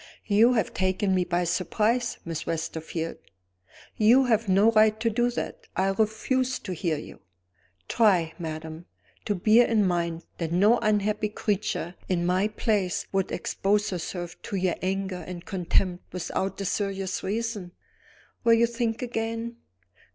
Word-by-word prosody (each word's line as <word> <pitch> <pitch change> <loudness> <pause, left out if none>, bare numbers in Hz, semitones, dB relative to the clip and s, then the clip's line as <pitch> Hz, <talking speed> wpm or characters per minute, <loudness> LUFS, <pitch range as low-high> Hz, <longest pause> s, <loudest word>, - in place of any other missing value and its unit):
"You 225 +4 +5
have 220 -6 0
taken 190 +1 +1
me 185 -1 +2
by 175 0 0
surprise, 215 +7 0
Miss 165 -2 -5
Westerfield. 165 0 -3 0.8
You 240 +5 +5
have 225 -3 +1
no 200 +4 +5
right 215 -1 +4
to 230 0 +1
do 240 +3 +2
that; 455 - -5
I 190 +1 +2
refuse 225 +6 0
to 185 - -6
hear 165 -2 -1
you." 150 - -10 0.7
"Try, 180 -8 +3
madam, 160 0 -6 0.4
to 205 - 0
bear 220 +6 +5
in 215 -3 +3
mind 170 -2 -1
that 165 -2 -2
no 205 +7 +4
unhappy 210 0 +1
creature, 210 -4 -2 0.2
in 175 -2 +1
my 185 +3 +2
place, 210 -4 0
would 195 -1 0
expose 205 +1 0
herself 175 -1 -5
to 230 -3 -5
your 185 -2 +1
anger 190 -1 -2
and 180 -1 -7
contempt 180 -1 -1
without 185 +2 -3
a 195 - -3
serious 195 -1 -2
reason. 210 -3 -3 0.7
Will 230 -1 +6
you 230 +1 +4
think 235 0 -2
again?" 230 0 -3
195 Hz, 145 wpm, -26 LUFS, 180-225 Hz, 0.8 s, Will